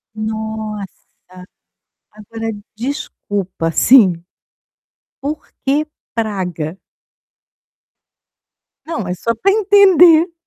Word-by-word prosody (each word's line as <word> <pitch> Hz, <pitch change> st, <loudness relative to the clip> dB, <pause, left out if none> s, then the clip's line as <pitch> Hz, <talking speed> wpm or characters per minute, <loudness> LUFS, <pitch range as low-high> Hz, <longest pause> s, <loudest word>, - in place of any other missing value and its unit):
Nossa, 220 Hz, -2 st, -5 dB, 1.1 s
agora, 225 Hz, +2 st, -6 dB, 0.3 s
desculpa, 205 Hz, -, -4 dB
sim, 190 Hz, -7 st, +5 dB, 1.0 s
por 295 Hz, +2 st, -5 dB, 0.2 s
que 290 Hz, +3 st, +1 dB, 0.3 s
Praga? 185 Hz, -7 st, -3 dB, 2.1 s
Não, 315 Hz, -, -4 dB
é 180 Hz, -, -2 dB
só 230 Hz, +6 st, -2 dB
para 390 Hz, -, +2 dB
entender. 375 Hz, -5 st, +5 dB
220 Hz, 70 wpm, -17 LUFS, 195-305 Hz, 2.1 s, sim